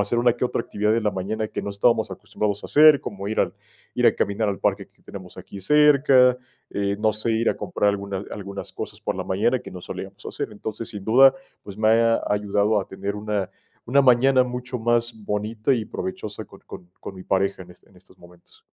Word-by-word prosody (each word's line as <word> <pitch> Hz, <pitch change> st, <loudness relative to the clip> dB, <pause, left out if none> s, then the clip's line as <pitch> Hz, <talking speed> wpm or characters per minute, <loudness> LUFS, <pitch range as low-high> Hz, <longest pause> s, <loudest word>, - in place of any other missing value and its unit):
hacer 100 Hz, +4 st, 0 dB
una 120 Hz, 0 st, +4 dB
que 120 Hz, +1 st, -1 dB
otra 120 Hz, -, -2 dB
actividad 105 Hz, +1 st, 0 dB
en 115 Hz, -, 0 dB
la 105 Hz, -, +2 dB
mañana 105 Hz, +3 st, -3 dB
que -, -, -4 dB
no -, -, -5 dB
estábamos 100 Hz, +4 st, +1 dB
acostumbrados 105 Hz, -1 st, -3 dB
a -, -, -4 dB
hacer, 150 Hz, -1 st, +7 dB
como 100 Hz, 0 st, -6 dB
ir 110 Hz, -, 0 dB
al -, -, 0 dB, 0.4 s
ir -, -, +2 dB
a -, -, +5 dB
caminar 100 Hz, +1 st, 0 dB
al 100 Hz, -, -2 dB
parque -, -, -1 dB
que -, -, -34 dB
tenemos -, -, -11 dB
aquí 100 Hz, -, -10 dB
cerca, 135 Hz, 0 st, +5 dB, 0.3 s
eh, 100 Hz, 0 st, -1 dB
no 110 Hz, 0 st, +2 dB
sé, 110 Hz, +2 st, -3 dB
ir 115 Hz, +1 st, +2 dB
a -, -, -4 dB
comprar 105 Hz, -, 0 dB
alguna 100 Hz, -1 st, -4 dB
algunas 100 Hz, -1 st, -7 dB
cosas -, -, -7 dB
por -, -, -2 dB
la -, -, -4 dB
mañana 105 Hz, +7 st, +1 dB
que -, -, -10 dB
no 90 Hz, -, -9 dB
solíamos -, -, -8 dB
hacer. -, -, -4 dB
Entonces, 110 Hz, +1 st, -6 dB
sin 105 Hz, -4 st, -8 dB
duda, 130 Hz, -, +6 dB, 0.3 s
pues 100 Hz, -, -10 dB
me 110 Hz, 0 st, +2 dB
ha 115 Hz, +1 st, +3 dB
ayudado 105 Hz, +1 st, +1 dB
a 95 Hz, -, -8 dB
tener 100 Hz, +1 st, -5 dB
una 105 Hz, -2 st, -3 dB, 0.3 s
una 140 Hz, +4 st, +3 dB
mañana 130 Hz, 0 st, +5 dB
mucho 125 Hz, 0 st, -5 dB
más 120 Hz, +1 st, +1 dB
bonita 110 Hz, +3 st, -1 dB
y 110 Hz, -3 st, -2 dB
provechosa 185 Hz, -, -6 dB
con -, -, -16 dB
con 90 Hz, 0 st, -11 dB
con 95 Hz, -, -8 dB
mi 95 Hz, -, -10 dB
pareja 95 Hz, 0 st, 0 dB
en 90 Hz, -, -15 dB, 0.2 s
en 95 Hz, -, -24 dB
estos 90 Hz, -, -21 dB
momentos. 85 Hz, 0 st, -19 dB
105 Hz, 220 wpm, -23 LUFS, 100-120 Hz, 0.4 s, hacer